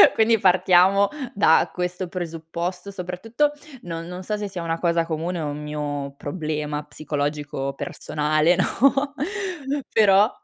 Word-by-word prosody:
quindi 225 0 +4
partiamo 190 +1 +5 0.2
da 160 -5 +4
questo 180 +1 -3
presupposto, 170 +2 -5
soprattutto 200 +10 -1 0.3
non 165 -1 -5
non 180 +1 -7
so 210 +2 -2
se 205 -1 -3
sia 185 -3 -6
una 165 0 -2
cosa 170 -1 +2
comune 165 +2 -3
o 155 - -2
un 145 +1 -5
mio 145 -2 -4
problema 150 -1 -3
psicologico 145 -2 -3
personale, 155 +4 +1
no, 275 +7 +2 0.8
però, 205 -1 +5
175 Hz, 125 wpm, -23 LUFS, 150-190 Hz, 0.8 s, partiamo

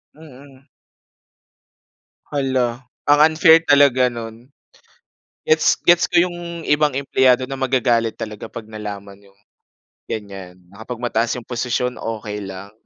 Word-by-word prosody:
Mm. 140 -3 -16 1.6
Hala. 130 -3 -1 0.2
Ang 145 0 +5
unfair 160 0 +6
talaga 140 -4 +4
no'n. 115 +2 -9 1.0
Gets 465 - +3
gets 175 0 +5
ko 175 - +2
'yong 175 -1 -4
ibang 150 -1 +2
empleyado 130 -1 +2
na 135 0 -6
magagalit 125 -3 +1
talaga 105 -1 -7
'pag 110 -2 -9
nalaman 100 -2 -8
'yong 100 0 -24 0.7
ganyan 95 -4 -7 0.2
na 100 - -16
kapag 125 -1 -7
mataas 115 -1 0
'yong 125 -2 -9
posisyon 125 0 -2
okey 105 -2 -5
lang. 95 +1 -9
125 Hz, 120 wpm, -20 LUFS, 110-140 Hz, 1.6 s, unfair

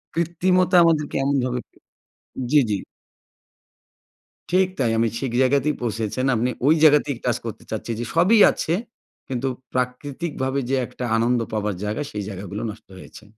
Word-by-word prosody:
কৃত্রিমতা 180 +2 +2
আমাদেরকে 155 -3 +1
এমনভাবে 130 -3 0 0.9
জি, 150 0 +6
জি। 100 - +1 1.7
ঠিক 185 +1 +3
তাই 120 -3 +2
আমি 115 +1 +3
ঠিক 130 -3 -3
জায়গাতেই 140 +3 +2
পৌঁছেছেন। 115 +2 -2
আপনি 120 +3 +1 0.2
ওই 155 - +6
জায়গাতেই 145 -4 +5
টাচ 120 -2 +1
করতে 115 - -6
চাচ্ছি, 110 +2 -4
যে 120 - -3
সবই 195 +7 +5
আছে 165 - -2 0.5
কিন্তু 130 0 -2 0.3
প্রাকৃতিকভাবে 130 +2 -2
যে 135 - +2
একটা 125 - -6
আনন্দ 120 +2 +2
পাবার 105 -2 -1
জায়গা 105 +6 -2
সেই 105 -1 -4
জায়গাগুলো 100 +1 -6
নষ্ট 105 - -15
হয়েছে। 105 - -13
130 Hz, 140 wpm, -23 LUFS, 115-150 Hz, 1.7 s, জি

